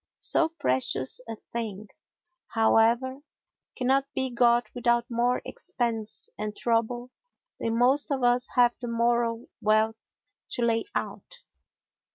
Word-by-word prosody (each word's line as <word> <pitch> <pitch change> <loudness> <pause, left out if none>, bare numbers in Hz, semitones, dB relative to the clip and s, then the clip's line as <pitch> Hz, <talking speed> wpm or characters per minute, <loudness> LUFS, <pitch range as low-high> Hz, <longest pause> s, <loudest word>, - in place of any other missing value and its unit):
So 325 - +2
precious 130 - -1
a 225 - -3 0.2
thing, 215 -3 -4 0.7
however, 235 +4 +3 0.6
cannot 270 +2 +1
be 260 -1 -1
got 240 0 +3
without 240 -1 +1
more 240 +1 +1
expense 225 -3 -3
and 210 0 -4
trouble 240 +1 0 0.5
than 230 0 -1
most 265 +6 +3
of 270 -3 -1
us 245 +1 +3
have 245 -1 +5
the 240 - -4
moral 235 0 +1 0.2
wealth 215 +1 +2 0.5
to 240 - -1
lay 230 -1 +1
out. - - -4
235 Hz, 120 wpm, -27 LUFS, 225-250 Hz, 0.7 s, have